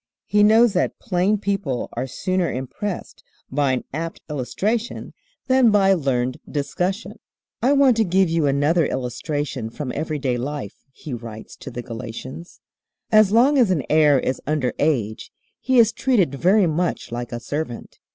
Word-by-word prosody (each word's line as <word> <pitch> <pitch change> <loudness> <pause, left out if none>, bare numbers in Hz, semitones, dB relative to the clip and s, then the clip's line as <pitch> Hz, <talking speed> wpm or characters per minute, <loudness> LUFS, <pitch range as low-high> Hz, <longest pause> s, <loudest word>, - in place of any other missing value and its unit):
He 210 +1 +2
knows 220 +1 +5
that 180 - 0
plain 195 0 +1
people 195 -11 -2
are 125 +3 -3
sooner 185 +6 -1
impressed 170 - -5 0.3
by 140 -1 +1
an 125 - -2
apt 165 +3 -4
illustration 210 - -2 0.3
than 260 -2 +4
by 195 -2 +4
learned 130 -6 0
discussion. 180 +8 -3 0.4
"I 260 +4 +3
want 275 -4 +4
to 225 - +4
give 190 0 +2
you 165 -2 +1
another 145 +4 +2
illustration 130 0 -3
from 130 +2 -5
everyday 145 -4 -2
life," 135 -5 -6
he 135 +1 -9
writes 115 -2 -8
to - - -9
the 120 -1 -6
Galatians. 125 +7 -8 0.5
"As 215 -2 +6
long 265 +6 +4
as 235 -6 +4
an 165 -7 +1
heir 150 -3 +5
is 130 - -2
under 150 -4 0
age 120 -8 -1 0.3
he 260 -1 +1
is 230 -2 +6
treated 210 - +1
very 185 +8 +3
much 170 -3 -1
like 120 0 -5
a 120 - -4
servant. 135 0 -5
155 Hz, 155 wpm, -22 LUFS, 130-200 Hz, 0.5 s, As